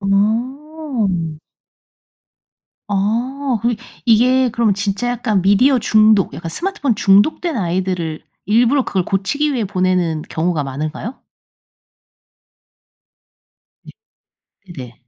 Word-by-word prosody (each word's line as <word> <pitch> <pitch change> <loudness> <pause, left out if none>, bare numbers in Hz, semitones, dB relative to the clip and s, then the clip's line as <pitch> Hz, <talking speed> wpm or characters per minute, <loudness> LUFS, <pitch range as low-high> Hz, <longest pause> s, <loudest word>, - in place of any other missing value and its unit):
음 220 - -1 1.5
아 235 +7 -1
그럼 235 0 +1 0.3
이게 250 +3 +4
그럼 225 -3 +1
진짜 200 +4 -2
약간 220 -5 0
미디어 245 +7 +4
중독 215 -2 +3
약간 165 0 -6
스마트폰 345 - -1
중독된 225 - +2
아이들을 180 -4 -2 0.2
일부러 240 +5 +3
그걸 185 -2 -1
고치기 285 +10 -1
위해 230 -5 -1
보내는 180 -4 0
경우가 160 -2 -1
많을까요? 155 - -5 2.7
네. - - -13 0.9
네. 125 -2 -8
210 Hz, 205 characters per minute, -18 LUFS, 185-250 Hz, 2.7 s, 이게